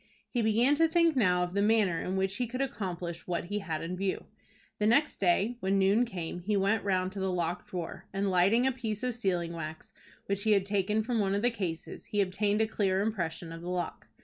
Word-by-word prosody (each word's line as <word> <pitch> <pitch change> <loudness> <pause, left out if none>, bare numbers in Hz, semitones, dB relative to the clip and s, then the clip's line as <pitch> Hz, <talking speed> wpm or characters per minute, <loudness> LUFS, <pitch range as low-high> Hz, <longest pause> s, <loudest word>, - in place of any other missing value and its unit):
He 240 - 0
began 230 +5 +3
to 325 +1 +5
think 335 -1 +3
now 180 -7 +3
of 180 0 -4
the 200 - +1
manner 205 -6 +3
in 185 - -2
which 190 +1 0
he 245 - -1
could 255 +3 -5
accomplish 180 -10 -4
what 175 -2 -1
he 205 +4 -3
had 165 -6 -4
in 175 +2 -3
view. 190 +1 -2 0.5
The 210 - +2
next 285 +7 +3
day 200 +6 +2
when 195 -1 +1
noon 200 +5 +4
came 175 -6 -5
he 200 +4 0
went 200 +3 +2
round 185 -2 0
to 200 - -6
the 190 0 0
locked 175 0 -2
drawer, 175 -3 -6
and, 195 0 0
lighting 195 +7 +4
a 265 - +3
piece 225 -3 -4
of 250 -1 0
sealing 180 -7 -1
wax 160 -1 -7 0.3
which 200 0 -1
he 215 +1 +3
had 195 -2 +2
taken 205 +2 +1
from 235 0 -1
one 195 -1 +1
of 205 - -1
the 245 - +3
cases, 180 -8 -5
he 210 - -2
obtained 205 +2 +1
a 220 - +2
clear 195 -3 +1
impression 170 -6 -2
of 165 0 -8
the 175 - -6
lock. 180 -2 -3
195 Hz, 230 wpm, -30 LUFS, 180-220 Hz, 0.5 s, to